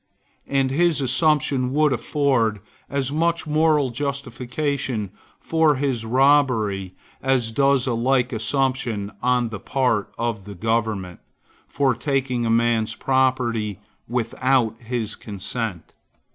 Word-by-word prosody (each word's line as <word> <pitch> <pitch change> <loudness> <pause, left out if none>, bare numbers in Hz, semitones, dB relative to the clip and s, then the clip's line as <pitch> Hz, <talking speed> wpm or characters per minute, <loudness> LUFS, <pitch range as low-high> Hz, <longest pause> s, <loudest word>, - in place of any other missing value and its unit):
And 135 -1 +1
his 170 +2 +3
assumption 135 -1 +2
would 150 -1 +3
afford 120 -4 +1 0.3
as 140 -1 -1
much 165 +2 0
moral 150 -3 +2
justification 130 -3 -3 0.3
for 160 -2 +2
his 130 -4 -1
robbery 115 -7 +2 0.3
as 130 -4 +1
does 140 +1 +3
a 125 - 0
like 125 +2 +1
assumption, 120 -3 -1
on 125 -1 +1
the 110 -3 -6
part 125 -3 0
of 115 -4 -2
the 100 -1 -8
government, 105 -3 -1 0.5
for 140 -2 +1
taking 125 -2 -1
a - - 0
man's 115 -1 +2
property 125 -6 0 0.3
without 120 0 +1
his 115 -2 -3
consent. 105 -2 -5
125 Hz, 115 wpm, -22 LUFS, 115-140 Hz, 0.5 s, his